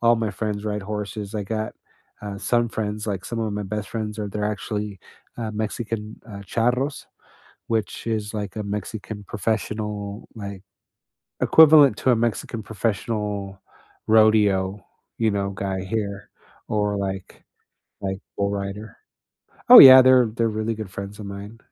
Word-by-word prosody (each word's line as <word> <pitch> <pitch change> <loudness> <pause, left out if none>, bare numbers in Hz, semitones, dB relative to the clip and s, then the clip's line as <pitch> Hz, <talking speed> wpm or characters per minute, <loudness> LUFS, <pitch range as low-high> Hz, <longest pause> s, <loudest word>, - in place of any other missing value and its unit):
all 120 0 +5
my 115 -2 -1
friends 105 +1 -4
ride 105 -1 -3
horses. 105 0 -5
I 105 - -2
got, 110 +2 -4 0.5
uh, 100 -1 -6
some 120 +2 +1
friends, 105 -1 -4
like, 95 -3 -3
some 115 -1 -4
of 110 -2 -2
my 105 0 -3
best 105 0 -4
friends 110 -2 -4
are 105 -1 -3
they're 105 +1 -3
actually, 105 -2 -5 0.4
uh, 115 -2 -4
Mexican, 110 0 -4
uh, 100 -2 -8
charros, 125 +7 -1 0.6
which 110 0 -2
is 105 -1 -2
like 105 -3 -5
a 110 - -3
Mexican 105 +1 -6
professional, 105 -1 -3
like, 100 -2 -7 0.8
equivalent 150 -7 +7
to 130 - +2
a - - +3
Mexican 115 0 -2
professional 105 -2 -3 0.5
rodeo, 105 -3 +3 0.3
you 115 -1 +2
know, 100 -1 -1
guy 95 0 -3
here, 100 -1 -4 0.4
or, 105 -1 0
like 95 -1 -5 0.6
like, 95 -1 -3 0.2
bull 100 0 0
rider. 100 +1 -5 0.7
Oh, - - +12
yeah, 130 -1 +12
they're 130 -2 +6
they're 115 +1 -1
really 110 +1 -2
good 105 -3 -7
friends 100 +2 -7
of 100 - -7
mine. 100 +3 -8
105 Hz, 150 wpm, -23 LUFS, 100-110 Hz, 0.8 s, Oh